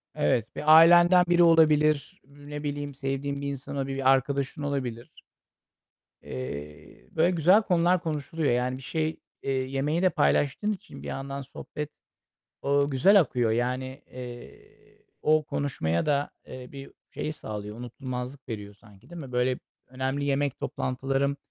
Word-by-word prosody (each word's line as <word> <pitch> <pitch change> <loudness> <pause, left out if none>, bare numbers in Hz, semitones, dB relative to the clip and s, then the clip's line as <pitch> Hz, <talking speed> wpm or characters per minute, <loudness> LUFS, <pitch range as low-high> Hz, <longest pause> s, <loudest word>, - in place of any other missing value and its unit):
Evet, 110 +9 0
bir 155 +1 +4
ailenden 175 +2 +7
biri 175 0 +5
olabilir, 155 -3 +4
ne 145 +1 -9
bileyim, 145 -1 -4
sevdiğin 140 +1 -3
bir 140 - -3
insan 140 0 -5
olabilir, 135 -1 -2
bir 135 -1 +4
arkadaşın 140 +2 0
olabilir. 130 -5 -3 1.1
Eee, 70 0 -8
böyle 165 +3 +2
güzel 180 +5 +5
konular 180 -2 +2
konuşuluyor. 155 -2 -1
Yani, 125 +1 0
bir 135 - -11
şey, 155 +4 -2 0.2
eee, - - -2
yemeği 135 +5 -1
de 185 - +4
paylaştığın 205 +9 +1
için 200 - -10
bir - - -7
yandan 140 +1 -5
sohbet, 150 +2 -7 0.7
o 140 0 +2
güzel 190 +10 +5
akıyor. 125 -9 +1
Yani, 125 +3 -2
eee, 125 -1 -12 0.2
o 155 0 +3
konuşmaya 85 - -1
da, 145 -1 0 0.2
eee, 130 -1 -9
bir 140 -1 -10 0.2
şey 155 - -4
sağlıyor, 105 -6 -7
unutulmazlık 125 +2 -6
veriyor 105 -2 -6
sanki, 105 +1 -20
değil 175 -1 -8
mi? 135 -3 -9
Böyle 125 +1 +1 0.3
önemli 130 +2 -2
yemek 140 -1 0
toplantılarım 135 +2 -1
140 Hz, 140 wpm, -27 LUFS, 125-150 Hz, 1.1 s, ailenden